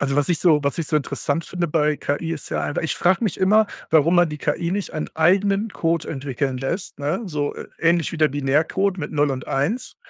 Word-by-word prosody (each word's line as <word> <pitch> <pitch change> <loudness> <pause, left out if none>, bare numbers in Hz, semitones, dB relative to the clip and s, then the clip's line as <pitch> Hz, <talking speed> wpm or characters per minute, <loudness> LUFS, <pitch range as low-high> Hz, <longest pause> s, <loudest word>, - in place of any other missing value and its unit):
Also, 140 -1 0
was 145 -1 +1
ich 175 -3 +1
so 160 -5 +4
was 140 +3 -1
ich 165 - -1
so - - -2
interessant 150 +2 -2
finde 175 -2 -2
bei 150 -1 +1
KI 160 +4 -2
ist 160 - -6
ja - - -1
einfach 145 - -2
ich 160 - -1
frage 185 +6 +2
mich 195 - -1
immer, 210 +3 +4 0.2
warum 160 +2 +4
man 175 -1 +5
die 150 0 -6
KI 160 +4 -1
nicht 200 +1 -3
einen 155 - -3
eigenen 195 +6 +2
Code 165 -3 -1
entwickeln 135 -2 -3
lässt, 145 +7 -4
ne? 150 +8 -1
So, 150 -5 -2
ä - - -9
ähnlich 170 0 +2
wie - - -4
der 155 -1 +4
Binärcode 150 +8 +1
mit 150 -5 -5
0 145 -1 +1
und 130 -1 -6
1, 175 - -1
160 Hz, 230 wpm, -22 LUFS, 145-180 Hz, 0.2 s, man